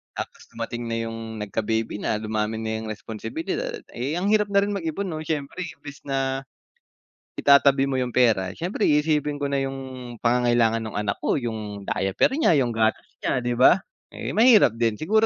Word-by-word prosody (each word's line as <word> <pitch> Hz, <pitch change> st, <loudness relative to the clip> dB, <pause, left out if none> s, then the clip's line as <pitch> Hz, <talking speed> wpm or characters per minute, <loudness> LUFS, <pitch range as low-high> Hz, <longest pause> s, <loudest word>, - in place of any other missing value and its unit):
tapos -, -, -7 dB
dumating 120 Hz, +1 st, -4 dB
na 115 Hz, -, -2 dB
'yung 115 Hz, 0 st, -5 dB, 0.2 s
nagka-baby 110 Hz, +2 st, -2 dB
na, -, -, 0 dB
dumami 110 Hz, 0 st, -1 dB
na 110 Hz, 0 st, -2 dB
yung 110 Hz, -, -6 dB
responsibilidad, 330 Hz, -, -5 dB
eh, 130 Hz, +6 st, -3 dB
ang 185 Hz, +3 st, 0 dB
hirap 210 Hz, -1 st, +3 dB
na 200 Hz, -, +5 dB
rin 205 Hz, -, -1 dB
mag-ipon 190 Hz, 0 st, -3 dB
'no, 155 Hz, -, -4 dB
siyempre 150 Hz, +1 st, -3 dB
imbis 145 Hz, -3 st, -10 dB
na, 135 Hz, -1 st, 0 dB, 1.0 s
itatabi 140 Hz, -1 st, +5 dB
mo 135 Hz, -, 0 dB
yung 125 Hz, -2 st, -2 dB
pera, 105 Hz, -7 st, +3 dB
siyempre 185 Hz, +5 st, -1 dB
iisipin 150 Hz, -1 st, +2 dB
ko 140 Hz, -, 0 dB
na 140 Hz, -, +1 dB
'yung 135 Hz, 0 st, -2 dB, 0.5 s
pangangailangan 120 Hz, -1 st, +3 dB
nung 110 Hz, -, -6 dB
anak 105 Hz, -1 st, -1 dB
ko, -, -, 0 dB
'yung 110 Hz, -5 st, -4 dB
diaper 95 Hz, 0 st, +1 dB
niya, 315 Hz, -, +4 dB
yung 120 Hz, -, -1 dB
gatas 110 Hz, -1 st, +1 dB, 0.2 s
niya, 130 Hz, -, +1 dB
'di 120 Hz, -1 st, -1 dB
ba? 130 Hz, +9 st, +6 dB, 0.3 s
Eh -, -, -5 dB
mahirap 220 Hz, -, +5 dB
din 115 Hz, -2 st, +2 dB
siguro 215 Hz, -, +2 dB
125 Hz, 175 wpm, -24 LUFS, 110-155 Hz, 1.0 s, ba